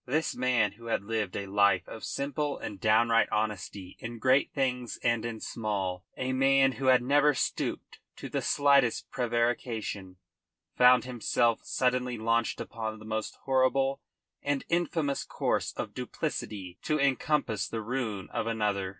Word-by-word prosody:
This 155 +5 0
man 125 -5 +2
who 115 +2 -12
had 115 - 0
lived 105 -3 -2
a 100 - -3
life 100 -2 +3
of 115 - -9
simple 145 +1 -2
and 100 - -7
downright 115 +2 +4
honesty 105 -3 -3
in 115 0 -6
great 130 +4 +3
things 125 -3 -1
and 115 -2 +2
in 115 -1 -4
small, 95 -6 -3
a 130 0 -1
man 135 0 +4
who 130 +3 -3
had 130 -1 +5
never 145 +2 +4
stooped - - -3 0.2
to - - -7
the - - -2
slightest 140 -4 +3
prevarication, 115 -5 -1 0.6
found 125 -1 +6
himself 120 -1 +1
suddenly 125 -1 0
launched 115 +1 0
upon 110 -1 -5
the 110 - -12
most 110 0 -3
horrible 135 +1 +2 0.4
and 145 -1 -1
infamous 165 -4 0
course - - -1
of - - -4
duplicity 95 -3 -5
to 155 0 0
encompass 140 -3 +1
the 115 - -4
ruin 110 -5 -3
of - - -1
another. 105 -4 0
120 Hz, 150 wpm, -29 LUFS, 110-135 Hz, 0.6 s, found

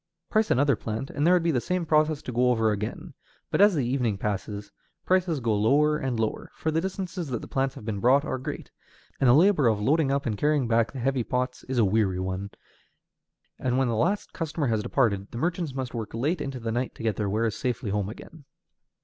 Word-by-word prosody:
Price 215 0 +2
another 140 +1 +3
plant 110 +5 -5
and 145 +3 0
there 180 - +6
would 175 - +2
be 170 - +2
the 125 -5 +1
same 180 +2 -1
process 155 -1 +2
to 125 - -5
go 125 +1 +2
over 110 -3 +2
again; 105 +1 -4 0.4
but - - +2
as 205 -2 +6
the 140 -5 0
evening 120 -5 0
passes, 100 0 -4 0.3
prices 180 -4 +2
go 115 -3 0
lower 145 +9 +3
and 130 -4 -2
lower, 110 -1 -2
for 160 - -2
the 160 +1 +1
distances 185 -2 -4
that 125 -3 -2
the - - -7
plants 135 0 -1
have 130 -6 -10
been 105 -3 -3
brought 135 +6 +4
are 130 - -2
great, 130 - -6 0.5
and 130 - +4
the - - +7
labor 165 -4 +5
of 110 -2 +2
loading 145 +6 +2
up 140 0 0
and 110 -4 -2
carrying 150 -4 +2
back 115 0 +2
the 135 - -8
heavy 130 0 0
pots 125 +1 -2
is 130 0 -3
a 115 - +5
weary 95 -2 +1
one, 95 +1 -3 1.1
and 125 0 0
when 130 -2 +2
the 115 - 0
last 180 - 0
customer 160 -2 -2
has 110 -4 +1
departed 105 -5 0
the - - -8
merchants 170 -1 -2
must 130 -2 -4
work 115 -1 -5
late 150 +8 0
into 135 -2 -4
the 115 -1 -3
night 120 +2 -2
to - - -9
get 110 -2 0
their 105 -2 -1
wares 110 +2 0
safely 125 -4 -2
home 100 -1 -1
again. 145 +6 -12
125 Hz, 230 wpm, -26 LUFS, 110-150 Hz, 1.1 s, the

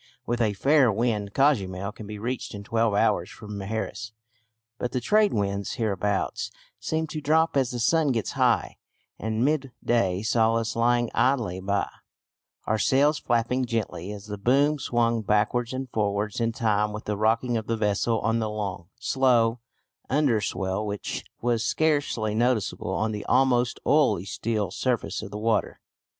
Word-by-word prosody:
With 120 0 -1
a 110 -3 +2
fair 135 +3 +4
wind 105 -2 -1
Cozumel 100 -9 +1
can 105 0 -10
be 105 0 -6
reached 120 +1 -4
in 100 - -7
twelve 115 -1 +1
hours 105 -4 +2
from 105 -2 -9
Mujeres; 110 +2 -4 0.7
but 125 - -3
the 130 - +1
trade 210 - +3
winds 100 -1 -1
hereabouts 105 -3 -1 0.3
seem 160 0 -1
to 155 -1 -6
drop 160 +2 +2
as 135 -3 +2
the 120 - -4
sun 160 +6 +3
gets 115 -4 -1
high, - - +1 0.4
and 110 +3 0
midday 120 -9 0
saw 115 0 +2
us 115 -1 -1
lying 120 0 +2
idly 120 -7 +1
by, 100 +1 0 0.8
our 110 0 0
sails 145 +6 +3
flapping 120 +1 0
gently 110 -5 -3
as 105 0 -8
the 105 -1 -6
boom 140 +7 +3
swung 115 -3 +1
backwards 110 +3 +1
and 130 0 -4
forwards 105 0 -1
in 115 0 +1
time 105 -2 0
with 105 - -7
the 105 - -1
rocking 115 +3 +1
of 110 -1 -2
the 115 - 0
vessel 110 +2 +1
on 115 +2 +1
the 110 -1 -1
long, 100 -5 -4
slow 120 -3 +2 0.5
underswell 105 -8 0
which 105 -1 -4 0.2
was 120 -1 +1
scarcely 145 -6 0
noticeable 120 -1 0
on 110 0 0
the 105 -1 -4
almost 125 -2 +2
oily 145 - +3
still 105 -2 -2
surface 125 +3 -1
of - - -7
the 105 - -6
water. 110 0 0
115 Hz, 160 wpm, -26 LUFS, 105-125 Hz, 0.8 s, fair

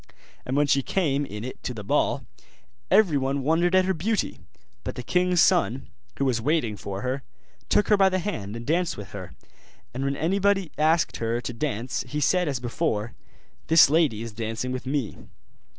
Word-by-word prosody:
And 130 +2 -1
when 145 - +4
she 140 -1 +3
came 145 -3 0
in 105 +1 -7
it 130 - -7
to 125 - -4
the 105 - -7
ball, 100 - 0 0.6
everyone 140 -8 +3
wondered 170 +5 +2
at 185 0 +5
her 190 - +1
beauty: 200 +5 -1 0.4
but - - -5
the 125 - -6
king's 180 +4 +2
son, 125 +7 +2 0.3
who 140 - 0
was 120 -4 +1
waiting 125 -5 0
for 100 0 -6
her, 130 +2 -2 0.5
took 210 - +3
her 210 - +5
by 195 -1 +5
the 185 - 0
hand, 115 - -4
and 115 0 -7
danced 170 +4 0
with 100 -2 -9
her; 90 -10 -8 0.6
and 130 +2 -3
when 140 0 0
anyone 195 +2 +1
asked 160 +2 +2
her 115 +1 -1
to 125 - -5
dance, 125 -1 -2
he 150 +4 -3
said 180 +4 +2
as 135 -4 -1
before, 120 -3 -2 0.5
'This 160 -3 +7
lady 150 -9 +2
is 115 - -6
dancing 115 +3 -3
with 130 0 -5
me. 135 -6 -2
140 Hz, 185 wpm, -25 LUFS, 115-170 Hz, 0.6 s, This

